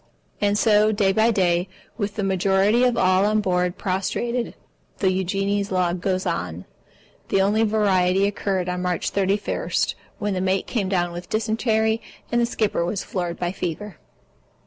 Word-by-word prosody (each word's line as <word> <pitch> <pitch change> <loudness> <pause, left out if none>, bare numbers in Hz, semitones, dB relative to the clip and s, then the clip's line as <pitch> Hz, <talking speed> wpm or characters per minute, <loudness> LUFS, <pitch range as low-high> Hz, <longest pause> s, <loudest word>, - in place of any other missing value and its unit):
And 205 0 +2
so, 215 -1 +4
day 205 -2 +2
by 220 +3 +3
day, 180 -4 +1 0.3
with 205 -2 -3
the 210 - -2
majority 195 +4 +2
of 245 -2 +1
all 185 -1 +3
on 215 +1 +2
board 180 -3 0
prostrated, 235 +6 -2 0.4
the 190 - +2
Eugenie's 195 +2 -1
log 180 -1 0
goes 185 0 -1
on. 90 +1 -3 0.6
The - - +2
only 205 +3 +2
variety 195 -3 +2
occurred 195 -2 -1
on 180 0 -2
March 180 -2 -1
31, 200 +1 -1 0.5
when 205 -1 -2
the 185 - -1
mate 190 +1 0
came 205 -6 -2
down 175 -2 0
with 175 +1 -8
dysentery 220 0 +1 0.3
and 240 0 +2
the 235 - +2
skipper 215 -6 0
was 185 +3 -2
floored 175 -2 -3
by 175 0 -2
fever. 180 +1 -5
195 Hz, 160 wpm, -23 LUFS, 185-210 Hz, 0.6 s, so